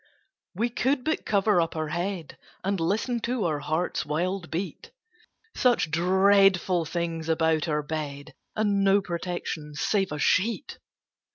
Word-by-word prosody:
We 230 +6 0
could 260 +2 0
but 315 +3 -1
cover 200 -2 +3
up 165 - -2
our 155 -1 -2
head, 175 -1 -3 0.3
And 195 0 0
listen 215 +8 0
to 235 -2 -1
our 155 -3 0
heart's 155 +5 -1
wild 175 +4 -2
beat 190 - -5 0.7
Such 240 -11 +2
dreadful 190 0 +4
things 165 0 -3
about 160 0 +2
our 150 -1 0
bed, 145 -1 -5 0.2
And 205 -2 +1
no 195 +1 +5
protection 170 -3 -4
save 195 +4 0
a 150 - -3
sheet! 215 - 0
180 Hz, 140 wpm, -26 LUFS, 160-200 Hz, 0.7 s, no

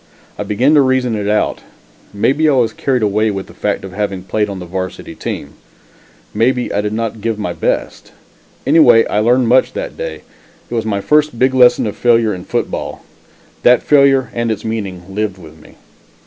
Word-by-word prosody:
I - - -6
began 105 +8 +1
to 150 - +6
reason 130 -2 +1
it 105 -2 -2
out 105 0 0 0.5
maybe 140 +10 +1
I - - +3
was 125 -2 +1
carried 135 -7 -1
away 105 +1 +1
with 95 -2 -4
the - - -15
fact 105 -1 -2
of 95 - -8
having 100 -2 -3
played 105 +2 -1
on 100 - -5
the 90 - -7
varsity 95 +1 -6
team - - -6 0.8
maybe 125 +3 0
I 105 - +1
did 105 0 -3
not 115 -1 -3
give 115 0 -2
my 105 -5 -3
best. - - -3 0.5
Anyway 120 -8 +6
I 105 - -1
learned 120 +3 +3
much 130 +2 +3
that - - -5
day. - - -6 0.5
It - - -4
was 115 -2 -1
my 100 -2 -1
first 150 +1 +2
big 130 +2 +2
lesson 125 -1 +5
of 105 - -4
failure 115 -3 +2
in 90 0 -8
football. - - -4 0.6
That 125 0 +4
failure 140 -2 +3
and 120 0 -1
its 110 - -4
meaning 100 -5 -4
lived 105 -2 -2
with 80 -3 -13
me. - - -18
115 Hz, 190 wpm, -16 LUFS, 105-130 Hz, 0.8 s, to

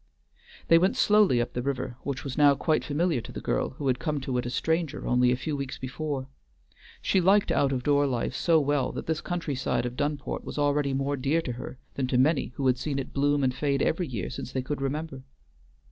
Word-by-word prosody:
They 165 - +7
went 185 +3 +2
slowly 210 - +4
up 120 - -2
the 125 - -2
river, 130 -2 -3
which 140 -2 -4
was 135 -2 -5
now 145 -1 +6
quite 155 +2 +1
familiar 155 -2 0
to - - -10
the - - -6
girl - - -1
who 145 - -5
had 130 -1 +1
come 150 -2 -1
to 130 -1 -3
it 125 - -3
a - - -2
stranger 160 +4 -1
only 125 0 +3
a - - +3
few 140 +4 -3
weeks 140 -2 -4
before. 135 0 -4 0.8
She 190 - +3
liked 195 +3 +4
out 140 -1 +2
of 130 -2 -2
door 145 0 +3
life 125 -3 -1
so 165 -2 +3
well 145 -3 +1
that - - -5
this 160 0 -1
countryside 155 -9 -2
of 120 0 -4
Dunport 145 +1 -2
was - - -7
already 145 -1 +1
more 140 +1 -1
dear 140 +5 +1
to 125 - -3
her 120 +2 -7 0.2
than 135 -2 -1
to 125 - +1
many 140 +3 +3
who 135 - -2
had 125 -1 +3
seen 140 +1 -2
it 135 -1 -5
bloom 145 0 +2
and 130 -1 +2
fade 140 +1 0
every 170 +1 0
year 115 -9 -4
since - - -6
they 130 - -1
could 140 +1 -4
remember. 140 0 -3
140 Hz, 230 wpm, -27 LUFS, 130-150 Hz, 0.8 s, They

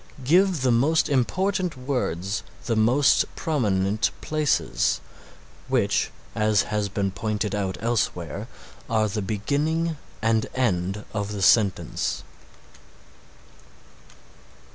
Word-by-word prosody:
Give 175 +1 +3
the 130 - +3
most 145 +9 +3
important 180 +5 0
words 115 - -2 0.2
the 115 - 0
most 120 +6 +4
prominent 105 -7 +1
places, 155 -1 +1 0.7
which, - - +1 0.2
as 110 -3 +2
has 105 -1 -2
been 100 0 -1
pointed 105 +1 -2
out 95 -2 -2
elsewhere, 105 -3 -1 0.4
are 110 -2 +2
the 105 +1 -3
beginning 150 - -1 0.2
and 110 0 +1
end 100 -5 0
of 105 -1 -2
the 100 -2 -3
sentence. 100 -4 +2
110 Hz, 100 wpm, -25 LUFS, 100-140 Hz, 0.7 s, most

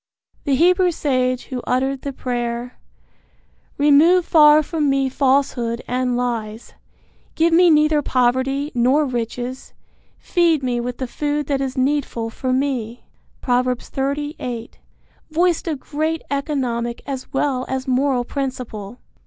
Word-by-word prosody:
The 280 -3 +2
Hebrew 360 +5 +4
sage 255 -6 0
who 255 -2 -5
uttered 265 +1 0
the 280 - -4
prayer: 240 -1 -4 1.0
Remove 310 +5 +5
far 305 -1 +6
from 300 -1 -1
me 270 -1 +1
falsehood 260 -3 0
and 250 0 0
lies; 230 -2 -4 0.6
Give 330 +1 +2
me 350 +1 +6
neither 305 -1 +4
poverty 260 +3 0
nor 260 +5 +3
riches; 245 0 -4 0.4
Feed 335 -5 +1
me 245 -1 0
with 245 +1 -4
the 260 - -3
food 295 +3 -2
that 275 -1 -1
is 265 -1 -3
needful 255 -4 -1
for 255 +2 -3
me. 255 -3 -2 0.4
Prov. 250 0 +1
30:8. 265 -1 -3 0.6
voiced 340 +2 +1
a 320 - 0
great 310 +3 -3
economic 250 -5 -2
as 265 -2 -6
well 270 -2 0
as 265 +1 -3
moral 260 -1 +1
principle. 245 -6 -5
265 Hz, 130 wpm, -20 LUFS, 245-295 Hz, 1.0 s, far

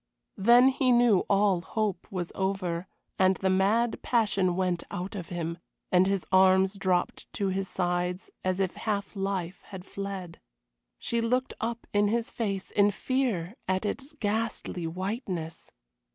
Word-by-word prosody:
Then 240 +6 +7
he 260 -1 +2
knew 240 -5 +5
all 200 -3 +3
hope 205 -2 -2
was 180 -3 -3
over, 185 -2 -2 0.3
and 190 0 +5
the 190 0 0
mad 215 +5 +2
passion 200 -6 +2
went 180 -2 0
out 185 +2 -5
of 180 -5 -6
him, 170 -1 -4 0.3
and 185 +1 +5
his 195 -2 0
arms 190 0 +5
dropped 185 -3 -1
to 200 -1 0
his 190 0 -2
sides 180 0 -1
as 185 0 0
if 190 -2 0
half 205 -1 -2
life 195 -2 -3
had 190 -2 -9
fled. 195 -4 -6 0.6
She 235 0 -1
looked 250 +3 0
up 230 +1 -3
in 205 0 +4
his 230 +2 -1
face 195 -4 -3
in 205 0 +4
fear 210 -5 -1
at 190 +2 0
its 275 +8 -4
ghastly 210 -5 -2
whiteness. 180 -2 -4
195 Hz, 150 wpm, -28 LUFS, 185-215 Hz, 0.6 s, Then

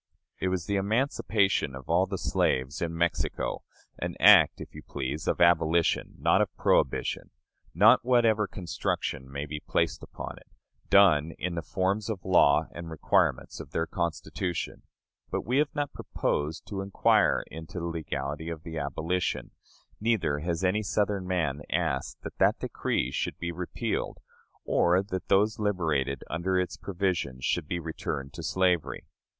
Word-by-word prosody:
It - - 0
was 90 -2 -1
the 100 +1 0
emancipation 100 - +1
of 65 -1 -10
all - - +3
the - - -3
slaves 65 +3 0
in 85 -1 -2
Mexico; 85 0 -1 0.4
an - - -3
act, - - +7
if - - -9
you - - -9
please, 70 +2 -4
of - - +1
abolition, 85 -1 +3
not - - +3
of - - 0
prohibition; 65 - +1 0.5
not, - - +6
whatever 115 -4 +3
construction 70 -6 -3
may 70 +1 -4
be 75 0 -5
placed - - -1
upon - - -8
it, - - -17 0.4
done 85 -6 +5
in 90 0 -3
the 85 - -2
forms 95 +5 -1
of 100 -5 -4
law 95 -1 +5
and 85 -1 -7
requirements 80 -2 +1
of 70 - -10
their 80 - 0
Constitution. 85 +1 -3 0.5
But - - -3
we 125 +4 +2
have 150 0 +2
not 145 -1 -2
proposed 75 +2 -2
to 100 -2 -4
inquire 95 0 +3
into 80 +2 -8
the 85 - -3
legality 80 -2 -4
of 80 -1 -6
the 80 -1 -5
abolition, 80 +5 -2 0.5
neither 95 -10 +1
has 85 +2 -2
any 95 +3 +2
Southern 100 -1 -1
man 80 -6 -1
asked 80 -5 -2
that - - -8
that - - +4
decree 65 - -1
should - - -2
be 85 0 -3
repealed, 90 +1 -3 0.5
or 90 +2 +3
that 95 -2 -5
those 105 +3 +3
liberated 80 -10 0
under 90 +4 -1
its 90 - -2
provisions 85 -10 -2
should 85 -4 0
be 85 - -2
returned 75 -4 -5
to - - -7
slavery. 90 -3 0
85 Hz, 155 wpm, -28 LUFS, 75-95 Hz, 0.5 s, act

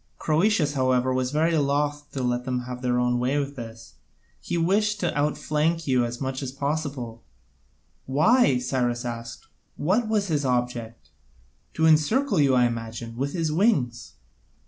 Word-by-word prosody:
Croesus, 160 -1 +2
however, 130 -1 +1
was 130 0 0
very 160 +4 +1
loth 145 0 0
to 135 - -3
let 125 0 0
them 125 -1 -2
have 125 0 -7
their 125 -1 0
own 125 0 +1
way 125 +3 0
in 140 -1 -1
this: 115 - -10 0.5
he 175 - -3
wished 210 +5 +1
to 175 - -1
outflank 150 +2 0
you 130 -3 +2
as 120 0 -5
much 130 0 -3
as 130 -2 -4
possible." 140 -5 -3 0.9
"Why?" 155 - +4
Cyrus 125 -1 -1
asked, 115 0 -6 0.3
"what 210 +9 +1
was 210 -2 +1
his 155 -6 0
object?" 120 -3 -2 0.6
"To 160 - +2
encircle 180 - +3
you, 135 -3 +4
I 125 -1 +4
imagine, 115 0 -4
with 140 +4 -2
his 165 -3 -1
wings." 150 - +1
135 Hz, 155 wpm, -25 LUFS, 125-155 Hz, 0.9 s, Why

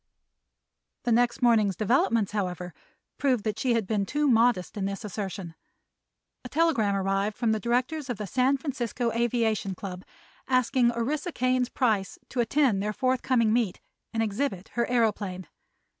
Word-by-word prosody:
The 240 - 0
next 240 +2 +2
morning's 215 -5 +4
developments, 225 -1 +2
however, 180 -4 -3 0.5
proved 255 -6 +1
that 215 -2 -2
she 250 -3 +2
had 225 -3 0
been 200 -1 -1
too 295 0 +1
modest 230 -6 +3
in 200 -2 -2
this 195 +1 -4
assertion. 195 -4 -5 0.9
A 250 - -7
telegram 280 -11 +2
arrived 195 +2 0
from 230 -3 +1
the 220 - +1
directors 255 +6 -1
of 245 - -2
the 210 - -4
San 255 +7 +2
Francisco 245 -4 -2
Aviation 225 -4 0
Club 185 -1 -7 0.4
asking 255 -1 +3
Orissa 285 +8 -2
Kane's 255 -2 +1
price 215 -8 0
to 255 - -4
attend 240 -4 +2
their 210 +1 -2
forthcoming 255 -2 +1
meet 225 -6 0 0.3
and 225 -1 0
exhibit 205 -3 -2
her 235 0 -1
aëroplane. 210 -6 0
230 Hz, 150 wpm, -27 LUFS, 200-250 Hz, 0.9 s, morning's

